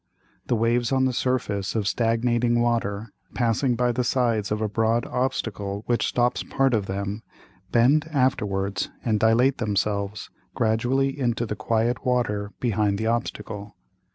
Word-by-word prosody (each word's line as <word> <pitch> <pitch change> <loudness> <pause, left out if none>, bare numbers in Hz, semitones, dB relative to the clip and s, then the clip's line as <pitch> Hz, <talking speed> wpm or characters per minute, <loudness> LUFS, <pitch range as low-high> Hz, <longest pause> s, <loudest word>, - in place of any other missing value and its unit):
The 120 - +2
Waves 115 +1 +1
on 130 -1 +3
the 130 - +1
Surface 115 -7 -1
of 105 -3 0
stagnating 120 +2 +1
Water, 115 -3 -1 0.2
passing 120 +1 +1
by 125 +1 +1
the 125 +1 -1
sides 115 -5 0
of 105 - 0
a 110 - 0
broad 115 +2 +1
Obstacle 105 -5 -2
which 120 -1 +1
stops 120 0 +1
part 135 -1 +1
of 105 -4 0
them, 100 +2 -3 0.5
bend 140 +7 +4
afterwards 100 -8 0 0.2
and 110 -3 +2
dilate 120 +5 +3
themselves 105 -1 -1 0.2
gradually 125 +5 +1
into 120 -2 0
the 105 - -4
quiet 115 +1 0
Water 105 -5 0
behind 105 -4 +1
the 110 - -2
Obstacle. 110 -3 -3
115 Hz, 145 wpm, -25 LUFS, 105-125 Hz, 0.5 s, bend